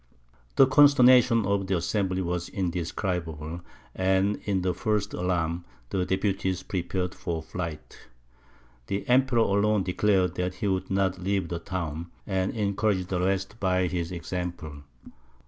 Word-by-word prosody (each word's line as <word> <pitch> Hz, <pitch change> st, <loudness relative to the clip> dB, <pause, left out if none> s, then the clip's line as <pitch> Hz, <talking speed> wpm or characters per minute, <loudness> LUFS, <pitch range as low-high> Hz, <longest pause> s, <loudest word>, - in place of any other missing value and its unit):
The 135 Hz, -, +7 dB
consternation 130 Hz, -4 st, +6 dB
of 100 Hz, -1 st, 0 dB
the 95 Hz, -1 st, +1 dB
assembly 95 Hz, +1 st, -1 dB
was 90 Hz, 0 st, -3 dB
indescribable; 85 Hz, -2 st, -3 dB, 0.3 s
and, 95 Hz, +2 st, +1 dB
in 95 Hz, -3 st, 0 dB
the 90 Hz, -1 st, +1 dB
first 105 Hz, +3 st, -1 dB
alarm, 85 Hz, -1 st, -1 dB, 0.3 s
the 90 Hz, -2 st, 0 dB
deputies 95 Hz, -1 st, -1 dB
prepared 90 Hz, -1 st, -2 dB
for 80 Hz, -2 st, -4 dB
flight. 80 Hz, -2 st, -6 dB, 0.9 s
The 100 Hz, -, -3 dB
Emperor 130 Hz, 0 st, +3 dB
alone 100 Hz, -1 st, +2 dB
declared 95 Hz, 0 st, +2 dB
that 90 Hz, 0 st, -2 dB
he 100 Hz, -, -2 dB
would 95 Hz, -1 st, -1 dB
not 95 Hz, -1 st, 0 dB
leave 95 Hz, -2 st, -1 dB
the 85 Hz, -, -3 dB
town, 85 Hz, -3 st, -4 dB, 0.2 s
and 95 Hz, -1 st, 0 dB
encouraged 100 Hz, -3 st, 0 dB
the 90 Hz, -, -1 dB
rest 95 Hz, +3 st, -1 dB
by 90 Hz, -1 st, +2 dB
his 85 Hz, -1 st, -2 dB
example. 85 Hz, -3 st, -5 dB
95 Hz, 135 wpm, -27 LUFS, 90-100 Hz, 0.9 s, The